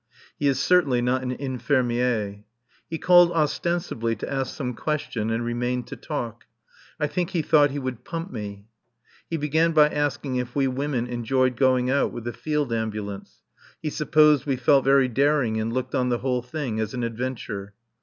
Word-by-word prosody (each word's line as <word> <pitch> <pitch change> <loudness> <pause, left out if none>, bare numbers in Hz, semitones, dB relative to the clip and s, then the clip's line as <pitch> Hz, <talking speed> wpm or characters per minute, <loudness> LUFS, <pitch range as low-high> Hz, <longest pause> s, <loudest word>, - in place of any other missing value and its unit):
He 145 - +1
is 135 -2 +2
certainly 145 -6 +3
not 125 +2 +1
an 130 - -3
infirmier. 125 -5 -1 0.5
He 160 - -3
called 175 +1 +6
ostensibly 155 -7 -1
to 110 - -5
ask 135 -1 -2
some 125 -4 -3
question 120 -5 -2
and 115 +1 -1
remained 125 +1 -1
to - - -6
talk. 120 -7 -5 0.5
I 150 - +2
think 175 +3 -2
he 170 -5 -1
thought 150 -1 +5
he 140 - -5
would 130 -3 -4
pump 165 +5 -5
me. 100 -3 -7 0.6
He 165 - -1
began 160 +3 +1
by 150 -1 +6
asking 145 -3 -1
if 125 -1 -4
we 140 -1 +2
women 130 -1 -1
enjoyed 125 +1 0
going 130 0 +2
out 140 - +2
with 120 - -7
the 120 0 -4
Field 150 -5 -1
Ambulance; 105 -3 -5 0.4
he 155 - -3
supposed 150 -1 +4
we 135 - +1
felt 135 +2 +4
very 135 -1 +5
daring 130 -3 +1
and 110 +1 -2
looked 130 +1 -3
on 125 -1 +1
the 120 - +1
whole 125 +1 -1
thing 125 -3 -4
as 110 +2 -2
an 125 - -2
adventure. 115 -4 -4
130 Hz, 180 wpm, -25 LUFS, 120-150 Hz, 0.6 s, called